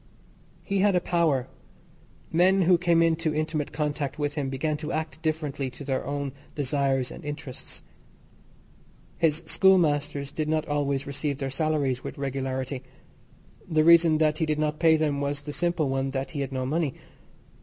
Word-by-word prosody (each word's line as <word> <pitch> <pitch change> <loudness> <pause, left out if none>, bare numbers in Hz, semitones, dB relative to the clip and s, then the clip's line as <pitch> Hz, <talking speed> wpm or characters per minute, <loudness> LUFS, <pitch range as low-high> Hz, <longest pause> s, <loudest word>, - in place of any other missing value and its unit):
He 200 -1 -1
had 200 0 +4
a - - +5
power; 165 -8 +1 0.8
men 185 +3 +4
who 175 0 +4
came 170 -1 +3
into 165 -1 +1
intimate 155 -1 -1
contact 150 -1 -2
with 145 -1 -1
him 145 -3 -2
began 150 +3 -1
to 155 +1 -5
act 160 0 -4
differently 150 -4 -2
to 130 - -10
their 135 -1 -1
own 140 -1 -3 0.2
desires 135 -2 0
and - - -10
interests. 145 -3 -7 1.4
His 165 0 +2
schoolmasters 150 -6 +2
did 155 +1 -2
not 155 0 0
always 140 -2 0
receive 140 0 -3
their 135 -2 -3
salaries 140 -4 0
with - - -6
regularity. 130 -1 -3 0.9
The 155 -1 +3
reason 165 -1 +6
that 155 0 +2
he 160 - +1
did 155 -1 0
not 150 0 -1
pay 160 -1 +5
them 150 -3 0
was 140 0 -2
the 145 0 -6
simple 170 -3 0
one 135 0 -1
that 135 0 -3
he 145 - -3
had 140 - -3
no 130 -1 -2
money. 150 0 -1
150 Hz, 165 wpm, -26 LUFS, 140-160 Hz, 1.4 s, reason